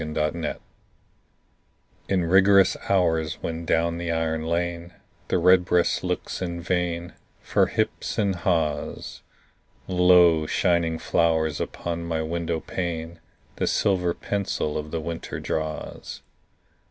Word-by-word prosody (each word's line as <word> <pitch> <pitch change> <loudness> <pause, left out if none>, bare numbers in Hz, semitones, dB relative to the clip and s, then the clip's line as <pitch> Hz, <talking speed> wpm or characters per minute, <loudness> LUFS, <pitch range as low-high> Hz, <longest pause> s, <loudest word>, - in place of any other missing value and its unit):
XVII—WINTER 75 +1 -2 1.5
In 95 -3 +1
rigorous 95 +2 +5
hours, 80 -5 +2
when 85 0 -4
down 85 +1 +1
the 85 0 -3
iron 80 -1 -1
lane 85 +1 -2 0.3
The - - +1
redbreast 90 0 +3
looks - - -3
in 85 -2 -3
vain 85 0 -2 0.3
For - - +2
hips - - -2
and 100 -3 +1
haws, 80 -5 -2 0.7
Lo, 90 -3 +5
shining 85 -2 +1
flowers 80 -3 +1
upon 85 0 -4
my 80 -1 -2
window 85 0 -2
pane 85 -2 -4 0.4
The - - 0
silver 90 -4 +1
pencil 100 -6 -2
of 75 0 -4
the 80 - -3
winter 85 +1 -5
draws. 80 -1 -5
85 Hz, 115 wpm, -25 LUFS, 80-90 Hz, 1.5 s, rigorous